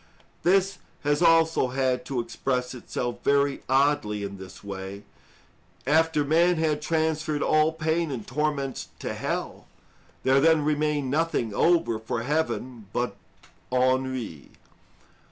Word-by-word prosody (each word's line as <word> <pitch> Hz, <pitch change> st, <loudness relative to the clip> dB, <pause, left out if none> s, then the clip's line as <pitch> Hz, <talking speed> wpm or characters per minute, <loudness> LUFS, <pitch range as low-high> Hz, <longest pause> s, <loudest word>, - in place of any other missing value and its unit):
This 190 Hz, +1 st, +2 dB, 0.2 s
has 145 Hz, +2 st, +1 dB
also 165 Hz, -4 st, +4 dB
had 130 Hz, -1 st, 0 dB
to 135 Hz, -3 st, -2 dB
express 125 Hz, +2 st, -2 dB
itself 120 Hz, -1 st, -5 dB
very 140 Hz, 0 st, +2 dB
oddly 135 Hz, -7 st, +2 dB
in 100 Hz, -1 st, -6 dB
this 95 Hz, +1 st, -11 dB
way; 100 Hz, 0 st, -7 dB, 0.8 s
after 155 Hz, +1 st, +3 dB
man 170 Hz, +4 st, +4 dB
had 155 Hz, -2 st, 0 dB
transferred 155 Hz, -1 st, 0 dB
all 155 Hz, +1 st, +3 dB
pain 160 Hz, +1 st, -1 dB
and 120 Hz, -6 st, -5 dB
torments 140 Hz, -2 st, -2 dB
to -, -, -4 dB
hell, -, -, -4 dB, 0.6 s
there 130 Hz, +1 st, +4 dB
then 160 Hz, -1 st, +4 dB
remained 150 Hz, -3 st, 0 dB
nothing 150 Hz, -8 st, 0 dB
over 165 Hz, -6 st, +2 dB
for 115 Hz, +1 st, -3 dB
heaven 130 Hz, -6 st, -2 dB
but 120 Hz, +2 st, -2 dB, 0.6 s
ennui. 130 Hz, -, 0 dB
140 Hz, 120 wpm, -26 LUFS, 125-160 Hz, 0.8 s, also